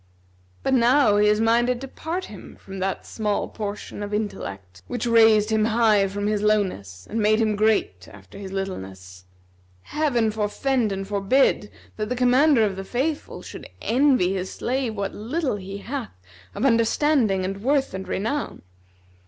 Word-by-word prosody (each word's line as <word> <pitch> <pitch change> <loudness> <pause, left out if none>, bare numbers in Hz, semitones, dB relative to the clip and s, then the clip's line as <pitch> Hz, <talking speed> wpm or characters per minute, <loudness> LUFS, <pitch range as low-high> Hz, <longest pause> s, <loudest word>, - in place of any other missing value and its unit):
But 270 - +1
now 245 -3 +4
he 210 0 +4
is 210 0 +3
minded 240 +2 +2
to 270 - -6
part 340 +7 -5
him - - -11
from 195 -1 -9
that 190 0 -2
small 210 -2 -2
portion 210 -1 -6
of 205 0 -3
intellect 100 - -5
which 245 -1 -3
raised 225 -2 +5
him 215 -1 +2
high 220 -3 +3
from 205 +1 -4
his 210 -1 0
lowness 185 - -1
and 225 +1 -2
made 215 +1 +3
him 220 -2 +1
great 205 - +1
after 105 - -13
his 195 -2 -7
littleness. 95 - -6 0.6
Heaven 245 -8 0
forfend 220 +2 0
and 195 0 -4
forbid 205 +2 +2 0.3
that 215 0 -3
the 250 - -1
Commander 250 +1 +4
of 195 -2 -3
the 195 - -4
Faithful 275 +9 -3
should - - -10
envy 250 -7 +2
his 185 -1 -3
slave 250 -3 -2
what 200 -1 -3
little 255 +3 -2
he 195 0 -7
hath 230 - -6 0.4
of 230 - -1
understanding 230 -4 +2
and 195 +1 -4
worth 270 +1 +1
and 190 0 -6
renown! 230 +9 -3
215 Hz, 160 wpm, -23 LUFS, 195-245 Hz, 0.6 s, raised